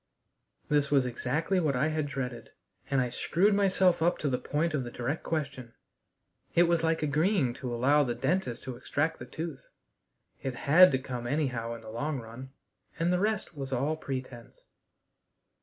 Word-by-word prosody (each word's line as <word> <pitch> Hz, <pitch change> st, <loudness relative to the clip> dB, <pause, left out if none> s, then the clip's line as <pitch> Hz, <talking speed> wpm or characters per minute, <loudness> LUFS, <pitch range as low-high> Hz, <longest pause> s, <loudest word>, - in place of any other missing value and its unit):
This 145 Hz, -1 st, +2 dB
was 140 Hz, -3 st, +3 dB
exactly 150 Hz, +9 st, 0 dB
what 150 Hz, -6 st, +1 dB
I 145 Hz, +5 st, +2 dB
had 155 Hz, -2 st, -1 dB
dreaded, 125 Hz, -4 st, -5 dB, 0.4 s
and 140 Hz, -, +2 dB
I 125 Hz, -1 st, 0 dB
screwed 190 Hz, -, +2 dB
myself 190 Hz, -3 st, +3 dB
up 175 Hz, +2 st, +3 dB
to 145 Hz, -, -1 dB
the 125 Hz, -, 0 dB
point 155 Hz, +3 st, -1 dB
of 145 Hz, -4 st, 0 dB
the 120 Hz, -, -6 dB
direct 125 Hz, +6 st, -3 dB
question. 140 Hz, -7 st, -4 dB, 0.8 s
It 170 Hz, -, +7 dB
was 170 Hz, -1 st, +2 dB
like 160 Hz, -1 st, +1 dB
agreeing 150 Hz, -, +2 dB
to 125 Hz, -2 st, -3 dB
allow 140 Hz, +5 st, +3 dB
the 120 Hz, -3 st, -2 dB
dentist 125 Hz, -2 st, -1 dB
to 130 Hz, -2 st, -5 dB
extract 155 Hz, +6 st, -1 dB
the -, -, -8 dB
tooth; 160 Hz, -1 st, -6 dB, 0.7 s
it 130 Hz, -2 st, -3 dB
had 175 Hz, +8 st, +6 dB
to -, -, +4 dB
come 125 Hz, -2 st, -5 dB
anyhow 125 Hz, -5 st, -1 dB
in 115 Hz, -, -10 dB
the 110 Hz, -1 st, -10 dB
long 140 Hz, +5 st, -2 dB
run, 115 Hz, +3 st, -9 dB, 0.5 s
and 170 Hz, +2 st, +1 dB
the 180 Hz, -, +2 dB
rest 210 Hz, -1 st, -1 dB
was 135 Hz, -2 st, -5 dB
all 140 Hz, +5 st, 0 dB
pretense. 130 Hz, -5 st, -7 dB
140 Hz, 175 wpm, -29 LUFS, 125-165 Hz, 0.8 s, It